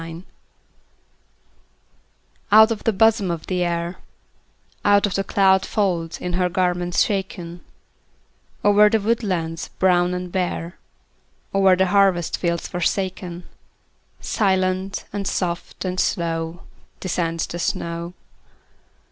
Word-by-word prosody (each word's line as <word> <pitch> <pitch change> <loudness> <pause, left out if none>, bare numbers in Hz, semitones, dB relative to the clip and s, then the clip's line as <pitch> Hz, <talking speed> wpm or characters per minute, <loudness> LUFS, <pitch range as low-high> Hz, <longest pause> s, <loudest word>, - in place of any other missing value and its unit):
SNOW 165 - -7
FLAKES 170 +2 -10 2.3
Out 220 +2 +8
of 220 - -3
the 225 - +4
bosom 215 -1 +3
of 170 -2 -4
the 180 -1 -1
Air, 170 +1 -2 0.9
Out 205 0 +4
of 200 - -2
the 195 - 0
cloud 190 -1 +3
folds 175 -6 -1
of 180 0 -4
her 180 0 +1
garments 180 -1 +1
shaken, 180 -4 -4 1.0
Over 205 +1 +6
the 225 - +2
woodlands 185 -7 -1
brown 180 -1 +3
and 180 0 -5
bare, 175 -2 -3 0.7
Over 195 -1 +5
the 190 +1 +2
harvest 190 -3 +2
fields 170 -1 -1
forsaken, 180 -1 -2 0.8
Silent, 190 -1 0
and 200 -1 -3
soft, 175 +1 -3
and 185 0 -2
slow 165 -2 -1 0.4
Descends 165 -3 -1
the 175 - -6
snow. 170 +1 -3
180 Hz, 115 wpm, -22 LUFS, 170-195 Hz, 2.3 s, Out